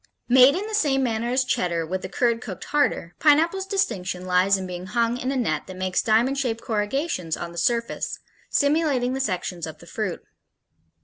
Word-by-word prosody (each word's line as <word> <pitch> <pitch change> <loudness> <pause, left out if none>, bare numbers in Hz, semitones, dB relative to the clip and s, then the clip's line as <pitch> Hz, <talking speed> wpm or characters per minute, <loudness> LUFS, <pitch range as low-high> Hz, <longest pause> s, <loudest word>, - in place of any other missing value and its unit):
Made 255 +3 +7
in 390 +3 -2
the 440 - -7
same 280 -9 +2
manner 230 -1 -1
as 255 +1 +2
Cheddar 170 -8 -1
with 185 +3 -3
the 185 - -6
curd 235 +3 +1
cooked 195 -7 -7
harder, 285 -12 0
Pineapple's 330 +6 +3
distinction 190 - -2
lies 185 +2 +3
in 190 - -5
being 180 0 -6
hung 235 +3 0
in 255 +2 -2
a - - -2
net 155 - -1
that 185 - -9
makes 185 0 0
diamond 240 +5 +2
shaped 235 -4 -1
corrugations 210 - -1
on 170 - -6
the 170 - -11
surface, 235 +5 -1 0.3
simulating 285 -4 +2
the 265 - -2
sections 180 -7 -2
of 160 -1 -8
the 170 - -15
fruit. 190 +1 -4
230 Hz, 190 wpm, -24 LUFS, 185-270 Hz, 0.3 s, Made